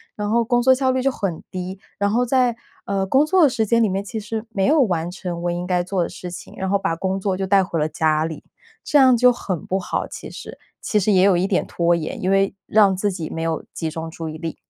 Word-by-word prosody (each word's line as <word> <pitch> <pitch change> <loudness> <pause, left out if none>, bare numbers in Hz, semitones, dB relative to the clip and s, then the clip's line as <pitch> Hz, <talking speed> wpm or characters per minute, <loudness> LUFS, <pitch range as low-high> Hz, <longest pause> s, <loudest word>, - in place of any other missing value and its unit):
然 210 -1 -3
后 235 +2 +3
工 240 +1 +1
作 260 +1 +6
效 260 0 +1
率 260 0 +1
就 270 - +2
很 195 -9 -4
低， 185 +1 -5 0.2
然 200 0 +2
后 240 +4 +1
在， 250 -1 +2 0.3
呃， 195 -1 -1
工 265 +9 +3
作 365 +2 +4
的 295 - +6
时 240 -3 0
间 230 +2 +3
里 - - +3
面， 195 0 -2
其 220 +2 -5
实 215 +1 -4
没 195 -4 0
有 300 +4 +4
完 175 -7 0
成 175 -2 -5
我 175 - 0
应 175 +1 -4
该 180 -1 +1
做 185 0 -1
的 170 - -1
事 180 - -8
情， 180 - -10
然 190 - -3
后 200 +1 +2
把 165 - -1
工 190 +3 -2
作 190 -1 -1
就 195 - -2
带 195 0 +4
回 175 -3 -3
了 150 - +1
家 155 0 +1
里， 160 -1 -6 0.4
这 295 - +2
样 260 -3 +6
就 250 +1 +5
很 185 -9 -4
不 190 - -1
好， 180 - -3
其 - - -9
实。 - - -9 0.2
其 210 - +1
实 210 - +2
也 185 -2 +4
有 195 -1 +5
一 175 +2 +1
点 195 -2 0
拖 170 0 +1
延， 160 -2 -5
因 185 - +1
为 195 0 +2
让 200 -3 +4
自 200 +2 0
己 170 -4 -5
没 165 - -5
有 165 -1 -2
集 160 - -3
中 160 0 -5
注 160 0 -6
意 155 - -7
力。 165 -1 -5
195 Hz, 295 characters per minute, -21 LUFS, 175-225 Hz, 0.4 s, 作